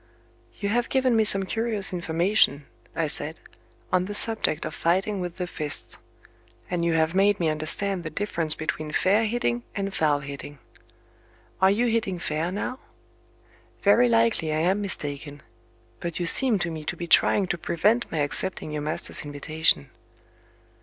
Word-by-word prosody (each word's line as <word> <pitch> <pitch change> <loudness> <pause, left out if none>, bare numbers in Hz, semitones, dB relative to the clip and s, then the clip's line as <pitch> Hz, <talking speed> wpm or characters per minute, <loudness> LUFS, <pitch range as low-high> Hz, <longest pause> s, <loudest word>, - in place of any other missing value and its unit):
"You 200 - -2
have 235 +2 0
given 260 -2 +2
me 220 - +4
some 195 -2 +5
curious 215 -1 0
information," 170 -3 +1 0.3
I 165 - 0
said, 155 +1 -2 0.5
"on 180 0 +3
the 205 +2 -5
subject 215 -8 +4
of - - -5
fighting 190 +4 0
with 175 -1 -5
the 180 - -2
fists; 155 -4 -4 0.7
and 175 -1 -1
you 170 -1 +1
have 160 0 +1
made 200 +2 +3
me 165 -2 +1
understand 170 +5 -1
the 155 - -3
difference 165 -2 -1
between 155 -1 -4
'fair 205 +4 +2
hitting' 165 - -1
and 195 -1 -3
'foul 150 -4 +1
hitting'. 140 +1 -8 1.0
Are 190 - +6
you 215 +5 +2
hitting 225 -5 0
fair 160 +1 -2
now? 250 +6 -4 1.0
Very 235 +5 +5
likely 230 -8 +2
I 155 +1 0
am 190 +5 +1
mistaken 145 -6 -5 0.6
but 170 -1 -5
you 175 - -1
seem 235 +6 +3
to 175 -2 -2
me 160 -1 -6
to 175 - -3
be 175 - -4
trying 190 +3 +4
to 175 - -1
prevent 210 +10 +1
my 155 - -1
accepting 155 +2 0
your 150 -1 -3
master's 150 +2 -2
invitation." 145 - 0
175 Hz, 160 wpm, -25 LUFS, 155-205 Hz, 1.0 s, Are